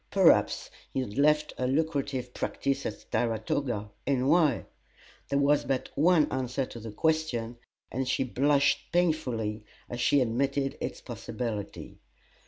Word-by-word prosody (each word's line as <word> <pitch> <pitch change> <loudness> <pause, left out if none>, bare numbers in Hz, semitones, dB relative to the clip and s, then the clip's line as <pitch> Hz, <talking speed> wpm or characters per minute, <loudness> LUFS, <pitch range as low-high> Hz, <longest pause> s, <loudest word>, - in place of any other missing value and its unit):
Perhaps - - +4 0.2
he - - -1
had 105 -5 -5
left 150 +1 +3
a 125 - +1
lucrative 140 -3 -1
practice 135 -1 -1
at 105 - -7
Saratoga 110 -1 -1 0.2
and 135 -2 +2
why? 160 -1 +3 0.6
There 140 - +1
was 140 +1 +3
but 130 0 -1
one 160 +1 +4
answer 130 0 -1
to 120 - -9
the 110 0 -7
question, 125 -4 0 0.3
and 130 +2 -2
she 130 - +1
blushed 140 +2 +2
painfully 125 -11 0 0.2
as 120 0 -5
she 140 +3 +4
admitted 135 +3 0
its - - -4
possibility. 110 -5 -5
135 Hz, 135 wpm, -29 LUFS, 120-145 Hz, 0.6 s, Perhaps